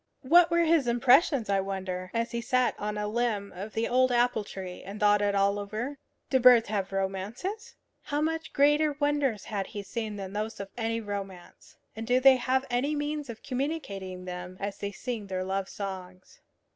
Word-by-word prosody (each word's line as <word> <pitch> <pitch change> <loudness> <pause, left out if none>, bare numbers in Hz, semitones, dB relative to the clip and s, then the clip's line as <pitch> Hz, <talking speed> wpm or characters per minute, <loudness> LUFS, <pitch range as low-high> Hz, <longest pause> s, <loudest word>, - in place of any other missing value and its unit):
What 335 +6 +6
were 340 0 +3
his 320 -5 +3
impressions, 250 +1 +4
I 200 -1 +2
wonder, 190 -1 -4
as 230 0 -1
he 235 -1 -2
sat 255 0 +2
on 210 0 -3
a 210 0 -2
limb 215 -2 -1
of 200 +4 -7
the 225 +1 0
old 255 +1 +3
apple 240 -2 +2
tree 185 -3 -8
and 200 +3 -8
thought 205 0 +4
it 205 -1 +1
all 200 +1 +2
over? 220 +8 -5 0.3
Do 260 - +4
birds 240 -3 +7
have 200 -3 -2
romances? 205 - -4 0.3
How 290 - -2
much 320 +1 -2
greater 295 +1 +3
wonders 290 -8 +1
had 200 -2 -3
he 205 -2 -6
seen 220 0 -4
than 195 -1 -6
those 215 +2 -3
of 200 -1 -6
any 230 -1 -1
romance! 195 -4 -8 0.2
And 225 +1 -6
do 250 +1 +4
they 265 0 +7
have 260 +2 0
any 270 +5 +1
means 295 -1 -3
of 225 -1 -8
communicating 200 - -4
them, 180 0 -7
as 200 0 -4
they 200 - -3
sing 225 -1 -5
their 185 -1 -2
love 190 0 -2
songs? 190 - -8
220 Hz, 190 wpm, -28 LUFS, 195-260 Hz, 0.3 s, birds